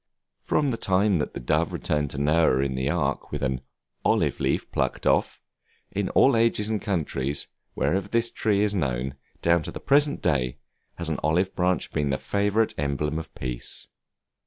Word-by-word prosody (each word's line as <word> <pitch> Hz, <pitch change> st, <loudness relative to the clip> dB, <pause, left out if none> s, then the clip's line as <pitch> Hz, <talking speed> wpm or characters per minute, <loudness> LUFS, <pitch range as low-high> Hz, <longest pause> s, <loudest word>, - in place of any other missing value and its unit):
From 145 Hz, -2 st, +1 dB
the 115 Hz, -, -1 dB
time 95 Hz, 0 st, +2 dB
that 75 Hz, -, -3 dB
the -, -, -3 dB
dove -, -, +1 dB
returned 75 Hz, -1 st, -1 dB
to 70 Hz, -, -6 dB
Noah 75 Hz, -2 st, +3 dB
in 70 Hz, -1 st, 0 dB
the 65 Hz, +1 st, -1 dB
Ark -, -, -1 dB
with -, -, -3 dB
an 65 Hz, -1 st, -1 dB, 0.4 s
"olive -, -, +2 dB
leaf -, -, -1 dB
plucked -, -, -1 dB
off," -, -, +2 dB, 0.5 s
in 100 Hz, -1 st, -1 dB
all 135 Hz, -2 st, +6 dB
ages 115 Hz, -2 st, +2 dB
and 110 Hz, -, -1 dB
countries, 75 Hz, -7 st, -2 dB, 0.3 s
wherever 95 Hz, +2 st, 0 dB
this 115 Hz, 0 st, 0 dB
tree 105 Hz, -2 st, +1 dB
is 105 Hz, -1 st, +1 dB
known, 65 Hz, -7 st, -1 dB, 0.3 s
down 85 Hz, 0 st, +4 dB
to -, -, -5 dB
the -, -, -7 dB
present 145 Hz, +1 st, +3 dB
day, 65 Hz, -3 st, +1 dB, 0.4 s
has 85 Hz, -2 st, -5 dB
an 80 Hz, -, -1 dB
olive 90 Hz, +5 st, +1 dB
branch 90 Hz, -1 st, 0 dB
been 75 Hz, -1 st, 0 dB
the 65 Hz, -, +1 dB
favorite 105 Hz, +5 st, +1 dB
emblem 75 Hz, +2 st, -1 dB
of 80 Hz, -, -9 dB
peace. 60 Hz, -2 st, -6 dB
85 Hz, 180 wpm, -26 LUFS, 70-105 Hz, 0.5 s, all